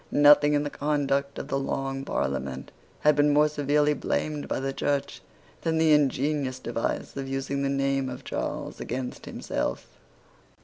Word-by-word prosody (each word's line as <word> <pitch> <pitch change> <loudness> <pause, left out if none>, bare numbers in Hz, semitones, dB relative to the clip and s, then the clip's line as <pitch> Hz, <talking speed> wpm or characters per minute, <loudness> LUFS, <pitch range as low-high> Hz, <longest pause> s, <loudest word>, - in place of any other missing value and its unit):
Nothing 145 0 +6
in 145 - +2
the 145 - -4
conduct 140 -1 0
of - - -5
the 135 - 0
Long 135 0 -2
Parliament 65 - -3 0.3
had 150 -1 +5
been 145 0 +4
more 150 +1 +5
severely 150 0 +2
blamed 150 +1 -2
by - - -1
the 135 0 -2
Church 140 0 -1 0.4
than 160 -1 0
the 160 -1 +5
ingenious 140 -2 +1
device 120 -2 -3
of 135 -1 -4
using 135 +1 -2
the 140 - 0
name 135 -1 0
of 125 +2 -7
Charles - - -4
against 125 0 -5
himself. 60 - -3
140 Hz, 160 wpm, -27 LUFS, 135-150 Hz, 0.4 s, Nothing